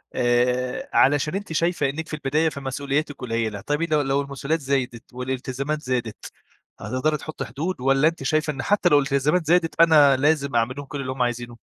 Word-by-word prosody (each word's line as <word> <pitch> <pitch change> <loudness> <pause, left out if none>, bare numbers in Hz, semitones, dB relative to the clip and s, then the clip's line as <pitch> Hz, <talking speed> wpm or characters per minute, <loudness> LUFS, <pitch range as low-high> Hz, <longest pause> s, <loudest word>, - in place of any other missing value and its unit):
آآ 125 +1 0
علشان 145 +4 +3
أنتِ 195 -4 -5
شايفة 165 -3 +1
إنِك 160 +3 -5
في - - -10
البداية 155 +2 +1
فمسؤولياتِك 140 +1 -3
قليّلة، 115 -4 -3
طيب 145 +6 -2
لو 155 -3 +1
لو 140 0 0
المسؤوليات 140 +3 -2
زايدت 130 -4 -3
والالتزامات 130 +4 -3
زادت، 120 -5 -4 0.5
هتقدري 150 +4 -1
تحطّي 155 +1 -6
حدود 145 +4 -4
والّا 135 +3 +3
أنتِ 165 -3 -2
شايفة 155 +2 0
إن 135 - -5
حتّى 200 -3 +2
لو 145 - +6
الالتزامات 140 +5 +1
زادت 165 0 +2
أنا 150 -5 +6
لازم 140 -2 +1
أعمل 115 +2 +1
لهم 145 - -6
كلّ 140 0 -6
اللي 130 -1 -4
هُم 130 -1 -5
عايزينه؟ 120 -1 -2
140 Hz, 180 wpm, -23 LUFS, 130-155 Hz, 0.5 s, لو